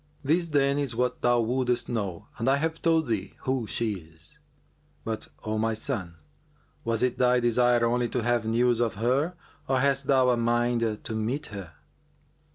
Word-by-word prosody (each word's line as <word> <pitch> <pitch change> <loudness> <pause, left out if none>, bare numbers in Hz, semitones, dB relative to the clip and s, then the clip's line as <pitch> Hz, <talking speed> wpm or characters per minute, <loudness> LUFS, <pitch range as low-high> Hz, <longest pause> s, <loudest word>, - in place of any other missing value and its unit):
This, 165 +5 +2
then, 140 -1 +2
is 135 -5 -2
what 125 +1 -1
thou 120 -1 +3
wouldest 125 +1 0
know 100 -7 -3
and 115 +4 +1
I 135 - +5
have 160 +3 -2
told 165 -1 +3
thee 105 -6 -3
who 130 -4 -1
she 115 -1 +1
is; 80 - -20 0.6
but, 110 -1 -4 0.2
O 110 0 -2
my 110 0 0
son, 95 -5 -3 0.7
was 115 0 0
it 125 -1 0
thy 125 0 +4
desire 120 0 +3
only 120 0 +1
to 125 - -2
have 120 -1 +1
news 120 +1 +2
of 115 -3 0
her 130 - 0 0.3
or 130 - +2
hast 140 0 +1
thou 130 -2 +4
a 120 - +1
mind 120 -2 0
to - - -4
meet 120 +7 -2
her?" 95 -5 -8
120 Hz, 175 wpm, -27 LUFS, 110-130 Hz, 0.7 s, I